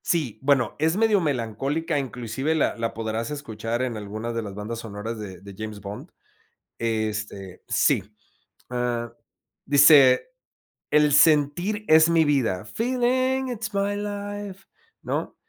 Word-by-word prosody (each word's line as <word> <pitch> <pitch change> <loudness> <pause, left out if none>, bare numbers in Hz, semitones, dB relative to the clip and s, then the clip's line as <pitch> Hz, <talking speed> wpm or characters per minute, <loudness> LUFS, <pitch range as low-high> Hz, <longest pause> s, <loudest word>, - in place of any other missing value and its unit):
Sí, 135 -11 -1
bueno, 135 -4 +2
es 160 +4 +1
medio 215 -3 +3
melancólica, 145 +3 -1
inclusive 130 +3 -3
la 155 - +1
la 115 -1 -3
podrás 115 0 -3
escuchar 120 -4 -4
en 120 -3 -3
algunas 110 +3 -5
de 115 - -2
las 100 -3 -7
bandas 110 +3 -5
sonoras 110 0 -6
de 95 -4 -8
de 100 0 -11
James 110 -1 -6
Bond. 100 +1 -8 0.7
Este, 110 -4 -3
sí. - - +2 0.7
Ah, 120 -1 -2 0.5
dice: 140 - +6 0.6
"El 150 -1 +4
sentir 160 +8 +3
es 160 +1 +6
mi 165 -1 +4
vida", 120 -10 0
feeling 255 - 0
it's 225 -3 -4
my 200 0 0
life, 205 -1 -6 0.4
¿no?, - - -3
130 Hz, 130 wpm, -24 LUFS, 110-170 Hz, 0.7 s, dice